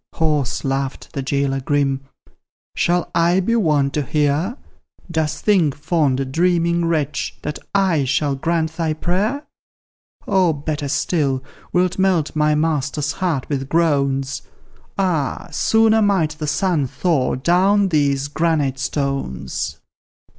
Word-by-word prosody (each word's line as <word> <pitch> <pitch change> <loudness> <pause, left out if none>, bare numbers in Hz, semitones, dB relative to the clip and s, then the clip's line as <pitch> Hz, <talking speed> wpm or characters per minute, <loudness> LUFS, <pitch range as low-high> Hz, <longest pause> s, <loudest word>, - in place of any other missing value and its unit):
Hoarse 150 -5 0
laughed 135 0 -3
the 140 - -2
jailor 135 0 0
grim: 135 0 0 0.7
"Shall 175 0 +1
I 170 +2 +3
be 230 +5 +1
won 150 -10 +2
to 150 - -1
hear; 150 - 0 0.5
Dost 160 -1 -2
think, 180 -9 +3
fond, 145 -4 0
dreaming 170 +1 +2
wretch, 150 -4 -1
that 150 - -4 0.2
I 180 -8 +2
shall 140 +2 +1
grant 160 +3 -1
thy 160 -2 0
prayer? 205 - -1 0.8
Or, 180 -5 +2
better 145 0 -3
still, 140 -2 0 0.3
wilt 180 +1 +1
melt 185 -6 +1
my 150 0 +2
master's 150 -2 0
heart 160 -6 -2
with 135 -2 -3
groans? 140 -4 +1 0.6
Ah! 175 -8 -1
sooner 220 0 +3
might 195 -7 +2
the 155 0 -5
sun 160 -3 +1
thaw 135 +1 0
down 190 +8 +3
these 140 -3 +1
granite 145 -3 0
stones. 130 - -3
155 Hz, 125 wpm, -20 LUFS, 140-175 Hz, 0.8 s, I